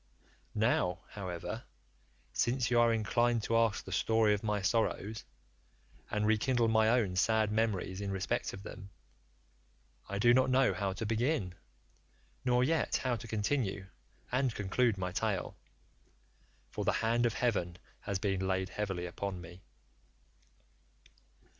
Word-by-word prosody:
Now, 100 -5 +1
however, 90 -5 -5 0.7
since 120 -1 +1
you 120 - +4
are 120 0 +5
inclined 115 +1 +1
to 115 - 0
ask 115 -2 +2
the 95 - -8
story 110 +2 +3
of 105 - -1
my 105 -2 0
sorrows, 110 +1 0 0.8
and 105 0 0
rekindle 115 +2 +2
my 110 0 +4
own 110 -6 +2
sad 110 +2 +2
memories 105 -3 -1
in 100 - -3
respect 95 -2 -1
of 95 - -9
them, 100 -1 -9 1.2
I 100 - -2
do 120 +4 +5
not 130 +1 +4
know 130 -5 +4
how 95 +1 -2
to 110 - -4
begin, 115 - 0 0.9
nor 125 -1 +3
yet 160 +4 +1
how 130 -2 0
to 115 - -9
continue 105 -3 -1 0.4
and 130 -1 +1
conclude 105 +2 +1
my 90 -1 -2
tale, 100 0 -2 1.2
for - - -3
the - - +2
hand 120 +1 +3
of 115 - -3
heaven 90 -8 0 0.2
has 100 - -2
been 95 -1 -1
laid 95 -1 0
heavily 95 -3 -3
upon 95 +1 -4
me. 90 +1 -11
110 Hz, 140 wpm, -32 LUFS, 95-120 Hz, 1.2 s, are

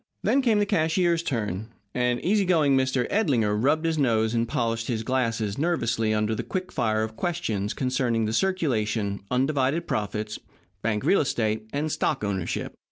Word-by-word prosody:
Then 275 - +3
came 230 -5 +3
the 205 - +3
cashier's 170 -2 +2
turn, 110 - -2 0.3
and 125 -1 +1
easy 205 +3 +2
going 160 -7 +3
Mr. 130 -1 +1
Edlinger 125 - +2
rubbed 145 +9 +2
his 160 -1 0
nose 110 -4 +2
and 115 0 +1
polished 115 -1 -1
his 115 -3 -1
glasses 115 -3 -1
nervously 115 -9 +1
under 105 +1 +1
the 110 - -2
quick 185 -1 -4
fire 110 -3 0
of 110 0 -5
questions 110 - -2
concerning 125 -3 0
the 110 - -2
circulation, 115 - 0
undivided 135 +4 +1
profits, 105 0 -2 0.4
bank 105 -2 -1
real 200 - +4
estate, 110 -5 -1
and 150 +2 -1
stock 140 -5 0
ownership. 95 -4 -2
125 Hz, 165 wpm, -26 LUFS, 110-155 Hz, 0.4 s, real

